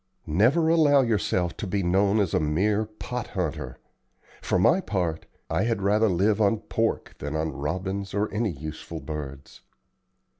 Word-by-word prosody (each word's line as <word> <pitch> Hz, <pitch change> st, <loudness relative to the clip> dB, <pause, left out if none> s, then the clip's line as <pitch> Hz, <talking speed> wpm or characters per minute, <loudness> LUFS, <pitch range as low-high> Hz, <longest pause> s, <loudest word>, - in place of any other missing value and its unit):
Never 125 Hz, -, +3 dB
allow 155 Hz, -4 st, +5 dB
yourself 95 Hz, -6 st, 0 dB
to 105 Hz, -, -4 dB
be 100 Hz, +1 st, -1 dB
known 100 Hz, +4 st, +3 dB
as 95 Hz, -5 st, 0 dB
a -, -, +3 dB
mere 100 Hz, +8 st, +1 dB
'pot 115 Hz, +2 st, -6 dB
hunter.' 90 Hz, -7 st, -4 dB, 0.6 s
For -, -, 0 dB
my 170 Hz, -, +4 dB
part, 90 Hz, -, -2 dB, 0.2 s
I -, -, 0 dB
had 115 Hz, -4 st, -1 dB
rather 105 Hz, +2 st, +3 dB
live 100 Hz, +4 st, +2 dB
on 105 Hz, +2 st, +3 dB
pork 115 Hz, 0 st, -1 dB
than 75 Hz, +2 st, -4 dB
on 80 Hz, 0 st, -1 dB
robins 95 Hz, +8 st, -3 dB
or 105 Hz, +1 st, +1 dB
any 110 Hz, +1 st, 0 dB
useful 80 Hz, +1 st, -7 dB
birds." 70 Hz, -3 st, -7 dB
100 Hz, 155 wpm, -26 LUFS, 80-110 Hz, 0.6 s, allow